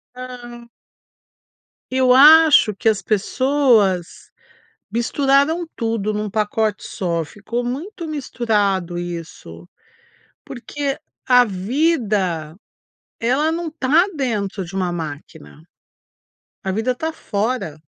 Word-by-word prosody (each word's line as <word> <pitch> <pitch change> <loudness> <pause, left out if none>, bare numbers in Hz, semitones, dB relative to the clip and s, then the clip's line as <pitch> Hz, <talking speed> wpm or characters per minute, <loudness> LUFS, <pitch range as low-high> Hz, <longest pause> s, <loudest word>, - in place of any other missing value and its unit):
Hã. 240 -1 -9 1.2
Eu 255 -1 +4
acho 300 -5 +7
que 225 - +2
as 215 -2 0
pessoas 220 - +2 0.9
misturaram 280 +7 +1
tudo 225 -3 -2
num 210 0 -3
pacote 215 0 -1
só, 170 -3 -2
ficou 215 +8 -5
muito 330 - -5
misturado 205 - -1
isso. 165 - -8 0.8
Porque 275 +3 -4 0.3
a 250 -1 +6
vida, 200 - -1 0.6
ela 265 +7 +1
não 330 0 -3
tá 310 +3 +3
dentro 210 -8 -2
de 175 - -11
uma 180 -2 -1
máquina. 155 -1 -8 1.0
A 190 - -2
vida 225 +5 -1
tá 320 +5 -3
fora. 205 - -3
230 Hz, 95 wpm, -20 LUFS, 190-270 Hz, 1.2 s, acho